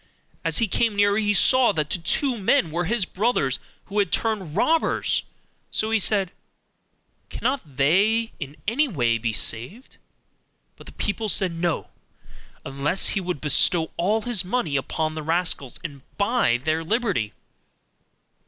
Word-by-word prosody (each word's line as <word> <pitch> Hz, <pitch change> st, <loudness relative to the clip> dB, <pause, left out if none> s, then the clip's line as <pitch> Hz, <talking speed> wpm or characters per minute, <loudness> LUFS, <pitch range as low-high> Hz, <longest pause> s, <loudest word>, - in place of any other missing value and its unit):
As -, -, 0 dB
he 230 Hz, -, +3 dB
came 225 Hz, +2 st, +1 dB
nearer, 205 Hz, +1 st, +3 dB
he 210 Hz, -1 st, +1 dB
saw 255 Hz, +3 st, +5 dB
that 155 Hz, -3 st, -2 dB
the -, -, 0 dB
two 250 Hz, -, +1 dB
men 190 Hz, -6 st, +1 dB
were 170 Hz, +2 st, -1 dB
his 215 Hz, +1 st, +1 dB
brothers, 180 Hz, -, 0 dB, 0.3 s
who 205 Hz, +1 st, -2 dB
had 200 Hz, -4 st, +1 dB
turned 200 Hz, -9 st, -1 dB
robbers; 320 Hz, +10 st, +1 dB, 0.5 s
so 220 Hz, +1 st, -1 dB
he 225 Hz, -, +3 dB
said, 195 Hz, -3 st, +2 dB, 1.0 s
'Cannot 180 Hz, -, -3 dB
they 205 Hz, +11 st, +2 dB
in 145 Hz, -1 st, -7 dB
any 280 Hz, +8 st, +2 dB
way 120 Hz, -, 0 dB
be 115 Hz, 0 st, -1 dB
saved?' 120 Hz, -, -4 dB, 0.8 s
But -, -, -15 dB
the -, -, -9 dB
people 215 Hz, +1 st, -2 dB
said 190 Hz, -2 st, +3 dB
'No,' 165 Hz, -1 st, -2 dB, 0.7 s
unless 140 Hz, +7 st, +1 dB
he 200 Hz, -, 0 dB
would 180 Hz, -5 st, -4 dB
bestow 160 Hz, +2 st, +3 dB
all 210 Hz, +6 st, 0 dB
his 240 Hz, -6 st, +1 dB
money 180 Hz, -6 st, -1 dB
upon 155 Hz, +3 st, -1 dB
the 155 Hz, -, -5 dB
rascals 160 Hz, -5 st, 0 dB
and 145 Hz, -5 st, -7 dB, 0.2 s
buy 200 Hz, -, +2 dB
their 155 Hz, +5 st, -1 dB
liberty. 200 Hz, -, -1 dB
185 Hz, 150 wpm, -23 LUFS, 155-220 Hz, 1.0 s, saw